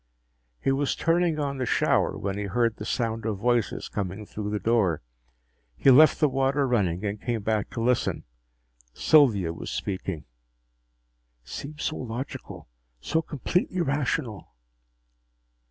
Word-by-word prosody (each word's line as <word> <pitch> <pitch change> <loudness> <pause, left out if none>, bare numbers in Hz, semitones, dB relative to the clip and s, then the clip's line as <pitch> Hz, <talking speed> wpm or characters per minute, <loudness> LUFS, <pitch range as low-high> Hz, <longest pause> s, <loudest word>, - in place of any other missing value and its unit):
He 135 - +1
was 135 +1 0
turning 165 -1 +1
on 140 -2 -2
the 130 - 0
shower - - +2
when 100 0 -3
he 105 0 -3
heard 115 +3 0
the 105 - -6
sound 115 -2 -1
of 110 -2 -2
voices 120 +1 0
coming 100 +1 -4
through 105 0 -5
the 105 - -1
door. 100 - +1 0.7
He 135 - +5
left 155 +5 +7
the 150 - +4
water 135 +1 +1
running 100 -6 0
and 105 0 -3
came 115 -4 -2
back 110 -1 0
to 115 - -4
listen. 125 0 +1 0.7
Sylvia 110 - +4
was - - -7
speaking. 95 -5 -4 0.6
" - - -46
seems 150 +2 -7
so 155 - -1
logical, 125 +2 -6 0.3
so 160 - 0
completely 175 +4 -1
rational." 135 - -2
115 Hz, 140 wpm, -26 LUFS, 100-140 Hz, 0.7 s, left